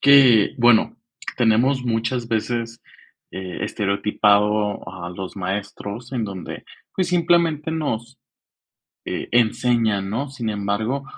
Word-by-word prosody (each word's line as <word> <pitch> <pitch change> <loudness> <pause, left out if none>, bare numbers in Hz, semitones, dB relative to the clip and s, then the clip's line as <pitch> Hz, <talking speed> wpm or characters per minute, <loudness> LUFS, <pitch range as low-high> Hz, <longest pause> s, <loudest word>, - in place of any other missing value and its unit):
que, 135 -6 +6
bueno, 120 -2 +4 0.4
tenemos 125 +3 +2
muchas 115 +1 -1
veces, 115 +1 -2 0.5
eh, 95 -3 -5
estereotipado 105 0 +1
a 85 0 -7
los 95 +2 -7
maestros 100 +5 -5
en 120 -4 -1
donde, 95 -4 -7 0.3
pues, 185 -2 0
simplemente, 170 -3 +2
nos, 130 -6 -3 0.9
eh, - - -4
enseñan, 115 -4 +2
¿no?, 135 +6 -2
sin 120 -5 -4
embargo, 105 +6 -2
115 Hz, 105 wpm, -22 LUFS, 100-130 Hz, 0.9 s, que